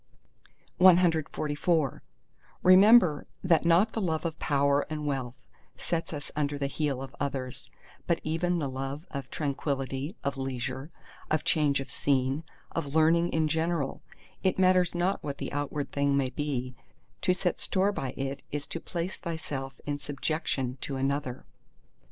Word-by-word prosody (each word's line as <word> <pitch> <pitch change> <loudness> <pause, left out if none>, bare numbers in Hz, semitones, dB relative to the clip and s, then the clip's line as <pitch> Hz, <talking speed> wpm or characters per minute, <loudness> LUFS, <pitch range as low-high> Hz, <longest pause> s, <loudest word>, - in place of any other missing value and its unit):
CXLV 165 -4 +3 0.6
Remember 185 -4 +7 0.2
that 170 -3 +3
not 175 +6 +4
the 225 - -1
love 160 -3 -1
of 165 -1 -3
power 140 -1 +2
and 150 -1 -4
wealth 135 -4 -2 0.4
sets 165 -1 -2
us 150 -2 -6
under 145 -1 0
the 140 - -1
heel 140 -2 -1
of 135 - -9
others, 135 -3 -4 0.4
but 170 - +2
even 170 +3 0
the 150 -4 -1
love 135 +4 -5
of 135 -2 -5
tranquillity, 140 - -2
of 140 0 -2
leisure, 130 +2 -3 0.4
of 155 - +1
change 150 -4 +2
of 135 - -6
scene—of 140 +2 -2
learning 165 +2 +4
in 160 -1 +1
general, 160 -2 -1 0.4
it 190 - +1
matters 185 -2 +4
not 180 +3 0
what 140 -1 -4
the - - -5
outward 145 0 -2
thing 140 -1 +2
may 130 -2 0
be—to 130 +4 -4
set 180 0 0
store 195 +1 +2
by 135 -10 -4
it 135 0 -3
is 145 -1 -3
to 165 - -5
place 175 +2 -4
thyself 140 -6 -5
in 145 -1 -2
subjection 145 -3 -2
to 140 - -3
another. 135 -1 -2
145 Hz, 145 wpm, -29 LUFS, 135-165 Hz, 0.6 s, Remember